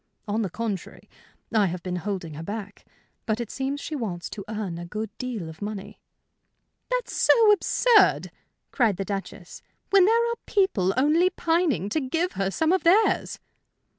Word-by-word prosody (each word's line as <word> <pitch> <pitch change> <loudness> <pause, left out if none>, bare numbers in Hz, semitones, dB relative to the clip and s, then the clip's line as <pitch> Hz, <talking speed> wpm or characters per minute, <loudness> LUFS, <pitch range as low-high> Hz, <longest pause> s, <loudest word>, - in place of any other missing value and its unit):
"On 210 +2 0
the 200 - -1
contrary, 210 -1 -5 0.5
I 210 -3 +4
have 175 0 -5
been 180 -1 -3
holding 180 -3 -4
her 150 - -7
back. 205 +3 -7 0.4
But 220 0 0
it 235 -3 -4
seems 270 +1 -3
she 310 - -5
wants 195 -10 -4
to 200 - -6
earn 205 -6 -4
a 175 - -6
good 215 +3 -5
deal 240 -9 -4
of 160 +3 -11
money." 205 -1 -6 0.9
"That's - - -2
so 450 -3 +5
absurd," 415 +1 +3 0.4
cried 225 -7 +2
the 195 - -3
Duchess, 195 -1 -6 0.3
"when 390 -2 +6
there 465 +3 +3
are - - -2
people 235 - +2
only 310 +7 +4
pining 330 - 0
to 310 - 0
give 330 +7 -1
her 195 -1 -1
some 315 - +1
of 375 - +2
theirs." 395 +6 +3
225 Hz, 165 wpm, -25 LUFS, -, 0.9 s, when